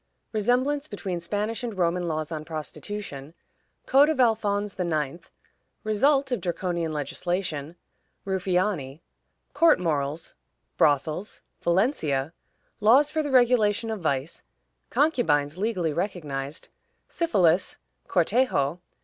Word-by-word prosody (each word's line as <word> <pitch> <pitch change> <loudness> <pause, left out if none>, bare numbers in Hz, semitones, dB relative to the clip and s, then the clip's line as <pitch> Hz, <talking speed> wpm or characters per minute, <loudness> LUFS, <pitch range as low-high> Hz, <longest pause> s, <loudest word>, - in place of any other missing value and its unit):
Resemblance 255 +7 +1
between 190 - -4
Spanish 210 +7 -2
and 230 -5 -4
Roman 175 0 +1
Laws 155 -1 -3
on 155 -1 -4
Prostitution. 155 -1 -6 0.5
Code 280 +3 +5
of 310 -4 -1
Alphonse 210 -4 +2
IX. 165 -1 -2 0.5
Result 270 +6 +2
of 245 -6 -1
Draconian 170 -2 -2
Legislation. 155 +1 -3 0.5
Ruffiani. 180 -6 -1 0.5
Court 330 - +5
Morals. 155 -2 -2 0.4
Brothels. 155 +7 +1 0.2
Valencia. 170 - +1 0.5
Laws 260 +8 +5
for 315 - 0
the 295 - -3
Regulation 235 -4 +3
of 220 - -3
Vice. 140 0 -2 0.5
Concubines 170 - +1
legally 185 -7 0
recognized. 150 -6 -4 0.4
Syphilis. 190 - +2 0.3
Cortejo. 175 - +1
185 Hz, 100 wpm, -26 LUFS, 155-225 Hz, 0.5 s, Code